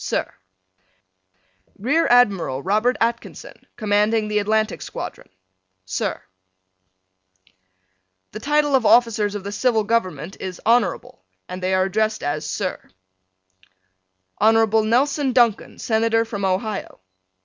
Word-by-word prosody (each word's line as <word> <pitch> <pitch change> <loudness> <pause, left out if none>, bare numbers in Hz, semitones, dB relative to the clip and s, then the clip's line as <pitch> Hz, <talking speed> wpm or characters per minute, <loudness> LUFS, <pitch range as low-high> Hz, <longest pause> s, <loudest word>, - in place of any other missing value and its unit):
Sir: - - -2 1.4
Rear 285 +11 +1
Admiral 195 - +2
Robert 215 +6 +1
Atkinson, 235 +1 -4
Commanding 215 +1 +1
the 210 0 +1
Atlantic 215 +1 0
Squadron. - - -7 0.6
Sir: 95 - -3 2.1
The 215 - -7
title 295 +3 +1
of 260 -3 +3
officers 220 -3 +3
of 205 - -5
the 200 - -5
Civil 225 +1 +1
Government 185 -7 -2
is 185 -2 -6
Honorable 225 - 0 0.2
and 180 0 -7
they 185 +1 0
are 185 - +3
addressed 215 +3 -1
as 150 +2 -3
Sir. 190 -3 -4 1.5
Hon. 225 +2 +5 0.2
Nelson 275 +2 +1
Duncan, 235 -4 +2
Senator 225 0 +1
from 205 -3 -4
Ohio. 195 +2 -3
215 Hz, 110 wpm, -21 LUFS, 195-235 Hz, 2.1 s, Hon